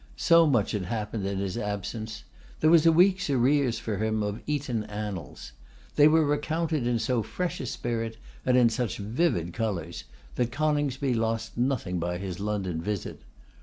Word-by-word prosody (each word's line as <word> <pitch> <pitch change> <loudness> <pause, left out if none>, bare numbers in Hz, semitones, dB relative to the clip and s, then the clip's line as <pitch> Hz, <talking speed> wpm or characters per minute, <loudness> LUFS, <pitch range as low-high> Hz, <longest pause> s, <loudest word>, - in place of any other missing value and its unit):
So 165 -1 +5
much 120 -8 +2
had 100 -4 -2
happened 105 0 -3
in 100 0 -2
his 100 +3 -2
absence! 110 +1 -4 0.4
There 155 - +4
was 165 -1 +6
a - - +8
week's 185 +1 +4
arrears 135 -1 +2
for 110 -3 -3
him 110 0 0
of 105 +2 -3
Eton 140 -7 -1
annals. 105 -11 -6 0.4
They 145 - +7
were 160 0 +4
recounted 155 -1 0
in 120 -1 +2
so 115 +1 0
fresh 180 - -3
a 130 - -4
spirit, 115 -1 -3 0.3
and 125 0 +3
in 120 -2 +6
such 120 0 -2
vivid 105 - 0
colours, 95 -7 -3 0.3
that 120 -1 0
Coningsby 145 -2 0
lost 115 -1 -1
nothing 120 -8 -1
by 90 +1 -2
his 95 -2 -5
London 100 -5 -2
visit. 105 +2 -4
115 Hz, 165 wpm, -27 LUFS, 105-145 Hz, 0.4 s, a